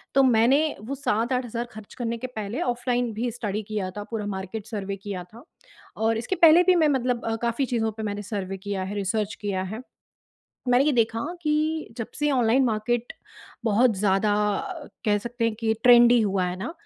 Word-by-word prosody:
तो 275 - +6
मैंने 245 +2 +4 0.2
वो 260 +6 -5
7-8 250 -1 0
हज़ार 235 0 -4
खर्च 215 -1 -11
करने 235 -2 -3
के 255 +3 -5
पहले 215 +2 -3
ऑफलाइन 245 -1 0
भी 235 +2 -2
स्टडी 215 -2 -3
किया 205 -3 -2
था 205 - -4
पूरा 215 -2 -3
मार्केट 195 +3 -6
सर्वे 200 -3 -4
किया 195 -2 -6
था 235 - -13 0.6
और 225 0 +2
इसके 240 +12 -2
पहले 335 0 +7
भी 370 0 +4
मैं 320 -3 +4
मतलब 250 -3 0 0.2
काफ़ी 235 +3 0
चीज़ों 225 -3 -1
पे 220 +1 -7
मैंने 205 -1 -3
सर्वे 195 -2 -4
किया 195 0 -4
है, 195 +2 -5
रिसर्च 210 +1 -1
किया 195 -3 -1
है। 215 +5 -6 0.9
मैंने 250 +2 +5
ये 300 - +3
देखा 230 -2 +1 0.2
कि 310 +1 0
जब 230 - -4
से 295 0 +1
ऑनलाइन 250 +1 +3
मार्केट 235 +1 -1 0.5
बहुत 225 +2 +3
ज़्यादा 200 +1 +2 0.7
कह 205 -2 +3
सकते 235 +3 -4
हैं 230 -1 +1
कि 220 -1 +2
ट्रेंडी 240 -1 +7
हुआ 195 -3 +1
है 180 0 -3
ना, 235 +10 -4
225 Hz, 190 wpm, -25 LUFS, 205-245 Hz, 0.9 s, पहले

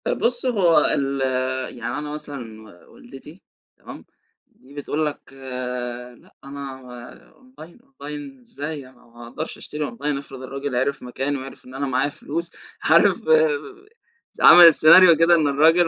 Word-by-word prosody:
طب - - -2
بص 245 +1 -1
هو 185 -10 +3 0.2
ال 140 -1 -2 0.6
يعني 120 +3 -5
أنا 150 0 -6
مثلًا 135 -8 -8 0.3
و - - -21
والدتي 195 - -14 0.4
تمام؟ - - -12 0.4
دي 135 +2 -21
بتقول 145 +2 -3
لَك 150 -2 -7 0.8
لأ - - -24
أنا 140 -1 -9 0.6
online 255 -9 -16
online 145 - -10
إزاي 145 +2 -8
أنا 125 -1 -23
ما 120 0 -15
أقدرش 155 +7 -7
أشتري 150 -3 -6
online 140 +4 -3
افرض 135 -2 -10
الراجل 135 0 -5
عرف 135 +2 -1
مكاني، 135 +3 -3
وعرف 135 0 -11
إن 130 - -14
أنا 140 +1 -3
معايا 130 +2 0
فلوس 165 +4 -6 0.3
عارف - - +4 1.2
س - - -12
عملت 170 -3 +9
scenario 170 +1 +7
كده 170 +1 +5
إن 155 -3 +1
الراجل 160 +5 +3
145 Hz, 145 wpm, -21 LUFS, 135-165 Hz, 1.2 s, عملت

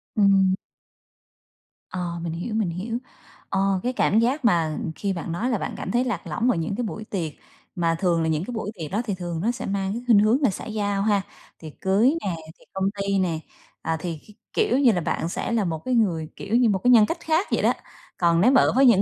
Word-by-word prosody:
Ừm. 195 -2 +4 1.3
Ờ, 175 -2 -4
mình 165 -1 -3
hiểu, 175 +7 -4
mình 215 -5 +1
hiểu. 195 +7 -3 0.5
Ờ, 195 0 +1
cái 250 - -1
cảm 220 -3 +3
giác 250 +4 +1
mà 165 -7 +2 0.2
khi 200 -1 -2
bạn 170 -1 -5
nói 220 +9 -1
là 240 - +1
bạn - - -4
cảm - - -4
thấy 240 +2 +2
lạc 210 -9 -3
lõng 225 +11 +1
ở - - 0
những 165 +4 -2
cái 245 - -2
buổi 215 0 -5
tiệc, 175 -7 -3 0.4
mà 165 -1 +1
thường 175 -3 +2
là 160 - 0
những 155 +1 0
cái - - -6
buổi 215 -2 -3
tiệc 155 - -5
đó 210 +5 0
thì 205 -5 -2
thường 175 -2 -4
nó 230 +5 +1
sẽ 245 - -6
mang 195 -1 -1
cái 235 - -4
khuynh 225 -4 +7
hướng 220 +7 +3
là 270 - +4
xã 190 - -6
giao 205 -2 -1
ha, 205 -1 +2 0.4
tiệc 155 -2 -9
cưới 215 +10 +3
nè, 185 -4 -2 0.2
tiệc - - -23
công 190 0 -1 0.2
ty 195 0 +1
nè, 170 -4 0 0.4
à, 160 - -1
thì 165 -2 -4
kh 210 - -14 0.2
kiểu 250 - +2
như 255 -4 +6
là, 180 -5 0
bạn 165 +1 -2
sẽ 230 - -3
là 220 -4 +1
một 160 -2 -2
cái 255 - 0
người, 165 -8 +1
kiểu, 205 +3 -3
như 240 -1 +4
một 195 -2 +1
cái 250 - +5
nhân 225 -4 +7
cách 330 +9 -3
khác 330 +3 +1
vậy - - +2
đó, - - +4 0.4
còn 170 -1 +3
nếu 250 +7 +6
mà 270 - +6
ở - - +3
với 270 +1 +6
những 225 -6 +6
200 Hz, 250 wpm, -24 LUFS, 175-230 Hz, 1.3 s, khuynh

